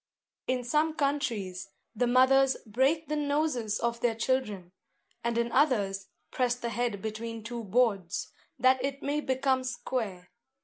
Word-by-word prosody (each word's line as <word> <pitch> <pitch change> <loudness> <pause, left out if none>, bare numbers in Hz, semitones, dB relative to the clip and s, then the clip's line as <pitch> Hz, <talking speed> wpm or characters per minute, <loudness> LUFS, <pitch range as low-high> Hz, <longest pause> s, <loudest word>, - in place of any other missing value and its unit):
In 255 -1 0
some 305 +5 +1
countries, 240 - -1 0.3
the 245 +3 +1
mothers 260 +2 +5
break 270 +9 +1
the 305 - -1
noses 285 -7 0
of 235 0 -1
their 235 -1 +1
children; 215 -7 -1 0.5
and 235 0 0
in 235 0 0
others 200 -10 +2 0.2
press 245 -1 +1
the 240 -1 -4
head 230 -3 -2
between 225 +1 -5
two 235 0 -5
boards, 200 -4 0 0.3
that 260 0 +4
it 275 +1 -3
may 290 +1 0
become 260 -1 +1
square. 225 -7 -4
245 Hz, 140 wpm, -29 LUFS, 220-270 Hz, 0.5 s, mothers